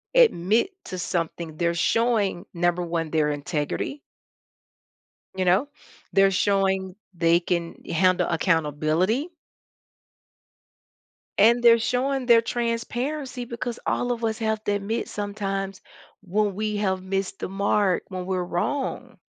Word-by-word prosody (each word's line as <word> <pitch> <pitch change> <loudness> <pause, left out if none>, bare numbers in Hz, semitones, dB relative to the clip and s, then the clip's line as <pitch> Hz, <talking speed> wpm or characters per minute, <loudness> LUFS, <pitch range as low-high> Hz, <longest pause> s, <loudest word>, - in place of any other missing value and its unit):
admit 235 - +4
to 185 - -6
something, 165 -2 -3
they're 170 -1 +1
showing, 215 -2 +1
number 175 +1 +1
1, 165 -2 -2
their 155 -2 +2
integrity 150 - -3 1.4
you 185 -1 0
know? 190 +11 +3 0.5
They're 195 0 +5
showing 190 -1 +1 0.2
they 170 0 +3
can 170 -1 -2 0.2
handle 185 +1 +3
accountability 165 - +1 2.1
and 235 +4 +5
they're 230 -1 +7
showing 255 +3 0
their 235 -2 +6
transparency, 245 +3 -3
because 235 0 -5
all 245 0 0
of 235 -1 -3
us 220 +1 -1
have 220 -1 -1
to 205 - +1
admit 205 +3 -2
sometimes 195 -1 -3 0.4
when 205 +1 0
we 210 +1 -2
have 190 -2 0
missed 195 +1 -3
the - - -3
mark, 200 -1 +1
when 185 -1 -5
we're 185 -1 -1
wrong. 245 +6 -3
195 Hz, 120 wpm, -25 LUFS, 175-230 Hz, 2.1 s, they're